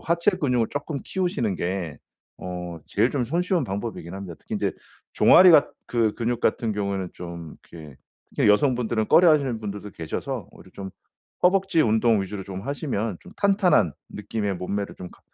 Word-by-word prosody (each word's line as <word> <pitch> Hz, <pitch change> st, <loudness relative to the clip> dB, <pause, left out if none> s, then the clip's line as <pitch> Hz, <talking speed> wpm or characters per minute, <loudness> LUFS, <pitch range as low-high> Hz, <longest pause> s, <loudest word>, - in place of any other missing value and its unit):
하체 170 Hz, +4 st, +2 dB
근육을 125 Hz, -, 0 dB
쪼끔 145 Hz, 0 st, -4 dB
키우시는 155 Hz, -, -1 dB
게 90 Hz, -4 st, -3 dB, 0.4 s
어 90 Hz, -2 st, -6 dB
제일 -, -, +1 dB
좀 130 Hz, -4 st, 0 dB
손쉬운 175 Hz, +4 st, 0 dB
방법이긴 100 Hz, -5 st, -5 dB
합니다. 95 Hz, -3 st, -7 dB
특히 -, -, -7 dB
인제 -, -, -1 dB, 0.4 s
종아리 180 Hz, -2 st, +7 dB
같 150 Hz, -, +6 dB, 0.2 s
그 115 Hz, -3 st, +1 dB
근육 120 Hz, 0 st, -1 dB
같은 110 Hz, 0 st, +1 dB
경우에는 100 Hz, -3 st, -2 dB
좀 85 Hz, -2 st, -8 dB, 0.2 s
이렇게 75 Hz, -5 st, -11 dB, 0.4 s
그냥 -, -, +4 dB
여성분들은 120 Hz, -2 st, +2 dB
꺼려하시는 145 Hz, -9 st, +4 dB
분들도 105 Hz, -1 st, -6 dB
계셔서 80 Hz, -3 st, -5 dB
오히려 -, -, -16 dB
좀 95 Hz, -1 st, -7 dB, 0.5 s
허벅지 190 Hz, -2 st, +3 dB
운동 110 Hz, -3 st, +3 dB
위주로 95 Hz, 0 st, -6 dB
좀 95 Hz, 0 st, -7 dB
하시면 115 Hz, -, -3 dB
좀 -, -, -13 dB
탄탄한 195 Hz, -, +3 dB, 0.2 s
느낌의 105 Hz, -2 st, -3 dB
몸매를 100 Hz, +3 st, -4 dB
좀 90 Hz, -, -9 dB
가 -, -, -20 dB
110 Hz, 365 characters per minute, -24 LUFS, 95-145 Hz, 0.5 s, 종아리